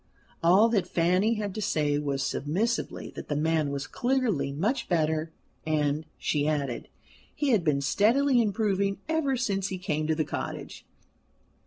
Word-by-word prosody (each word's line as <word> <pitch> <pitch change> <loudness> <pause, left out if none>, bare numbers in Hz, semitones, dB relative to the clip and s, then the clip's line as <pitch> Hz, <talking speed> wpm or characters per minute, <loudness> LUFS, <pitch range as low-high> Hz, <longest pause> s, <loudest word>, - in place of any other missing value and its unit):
All 185 +7 +6
that 210 -5 +1
Fanny 185 +6 +2
had 205 -2 -3
to 215 - -4
say 150 -8 +1
was, 140 -2 -1
submissively, 200 +15 -2
that - - -8
the 145 - -2
man 155 0 +1
was 140 0 -3
clearly 225 - 0
much 215 - -1
better; 160 -2 +1 0.3
and, 150 0 0
she 145 -1 0
added, 140 -6 -2 0.5
he 290 - 0
had 220 -8 +3
been 145 -3 +1
steadily 240 - +3
improving 200 -2 0
ever 315 -5 +1
since 200 -6 -1
he 190 - -4
came 155 -4 -2
to 160 - +1
the 155 -1 0
cottage. - - -6
175 Hz, 155 wpm, -27 LUFS, 150-215 Hz, 0.5 s, All